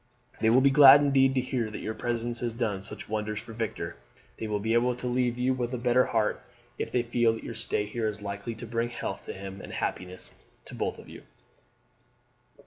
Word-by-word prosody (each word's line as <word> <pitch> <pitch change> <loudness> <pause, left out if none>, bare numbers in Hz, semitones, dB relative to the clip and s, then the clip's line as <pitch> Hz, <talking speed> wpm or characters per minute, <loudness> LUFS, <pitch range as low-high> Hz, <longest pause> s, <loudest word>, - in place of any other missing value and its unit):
They 110 - +3
will 125 +3 +5
be 140 +1 +5
glad 140 0 +9
indeed 135 -2 +3
to 130 - +3
hear 125 -3 -2
that 105 - -6
your 110 - -2
presence 120 +1 -3
has 120 -2 -3
done 110 -5 -1
such 95 - -5
wonders 105 0 -2
for 115 - -10
Victor. 115 -1 -4 0.4
They 110 - -4
will 105 -1 -1
be 110 +2 0
able 120 +1 +3
to 125 - -7
leave 125 -1 0
you 125 +1 +2
with 125 0 -2
a - - -2
better 125 +1 +3
heart 110 -2 0 0.4
if - - -3
they 125 - +1
feel 120 -1 +2
that 115 - -7
your - - -6
stay 110 -2 -2
here 110 +2 -2
is 105 0 -4
likely 100 +2 -5
to 120 - -8
bring 115 +1 -1
health 120 - -5
to - - -5
him 95 0 -8
and - - -9
happiness 90 0 -4 0.3
to - - -11
both - - -2
of - - -13
you." - - -11
115 Hz, 225 wpm, -28 LUFS, 110-125 Hz, 0.4 s, glad